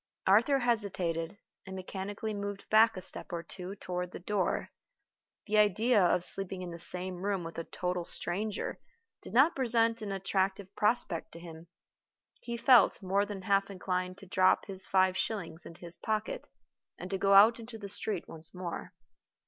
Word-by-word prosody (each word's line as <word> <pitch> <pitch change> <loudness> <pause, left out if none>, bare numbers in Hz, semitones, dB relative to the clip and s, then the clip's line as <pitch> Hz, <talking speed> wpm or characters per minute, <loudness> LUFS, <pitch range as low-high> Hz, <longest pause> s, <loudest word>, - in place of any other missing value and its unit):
Arthur 230 +9 +4
hesitated, 200 -8 -1 0.3
and 190 - -7
mechanically 200 +3 -5
moved 200 -1 -5
back 220 -1 +5
a 185 - -6
step - - -5
or 170 -1 -4
two 185 +2 -8
toward 180 -2 -4
the - - -7
door. 190 +1 -1 0.7
The 215 -1 +2
idea 210 +2 +3
of 180 0 +3
sleeping 190 -1 +3
in 175 - -6
the 170 - -8
same 180 +1 +2
room 195 0 -2
with 165 0 -7
a 165 - -5
total 180 -1 -3
stranger 200 +5 -3 0.4
did - - -10
not 275 +8 +4
present 230 -3 +2
an 205 -2 -4
attractive 195 0 -2
prospect 210 -6 0
to 170 - -10
him. 165 -1 -11 0.7
He 235 -1 -5
felt 235 -4 +5
more 200 +2 +1
than 200 -2 -7
half 195 +1 +2
inclined 185 -1 -3
to 195 - -12
drop 185 0 +3
his 190 -2 0
five 185 -1 +3
shillings 180 -5 -3
into 165 - -13
his 170 -1 -4
pocket 215 0 -3 0.5
and 180 +2 -8
to 195 - -2
go 195 0 +4
out 220 +4 +7
into 230 0 -9
the 205 -2 -7
street 200 -1 -4
once 160 +2 -3
more. 180 -2 -6
195 Hz, 175 wpm, -31 LUFS, 180-215 Hz, 0.7 s, out